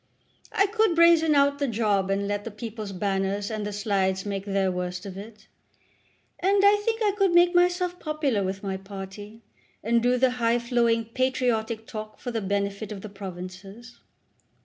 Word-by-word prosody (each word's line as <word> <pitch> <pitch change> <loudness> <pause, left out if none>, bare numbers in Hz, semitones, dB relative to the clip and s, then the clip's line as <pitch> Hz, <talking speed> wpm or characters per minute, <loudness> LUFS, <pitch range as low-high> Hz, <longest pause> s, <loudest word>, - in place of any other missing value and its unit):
I 395 - +3
could 430 -3 +1
brazen 335 -2 +5
out 280 0 +3
a 280 - +2
job 210 -4 +1
and 200 +1 0
let 205 0 -2
the 230 - -5
'People's 215 -1 -7
Banners' 195 +1 -1
and 215 -1 -3
the - - -4
Slides 195 -2 0
make 200 -1 -3
their 195 -2 +1
worst 180 +1 -4
of 190 -2 -7
it. 210 +1 -11 0.9
And 390 +2 +3
I 410 +1 +5
think 450 +1 0
I 415 - +3
could 390 -3 +2
make 350 0 +6
myself 355 0 +2
popular 295 -9 -1
with 190 +1 -4
my 190 -1 -2
party, 200 +3 -9 0.4
and 230 +2 +2
do 245 +1 +2
the 255 0 +3
high 235 -1 +1
flowing 235 -1 +1
patriotic 230 -2 -1
talk 215 -1 -7
for 245 - -5
the 225 -1 -2
benefit 200 +1 -2
of 200 -2 -6
the 215 - -8
Provinces. 195 +4 -9
220 Hz, 175 wpm, -26 LUFS, 200-265 Hz, 0.9 s, make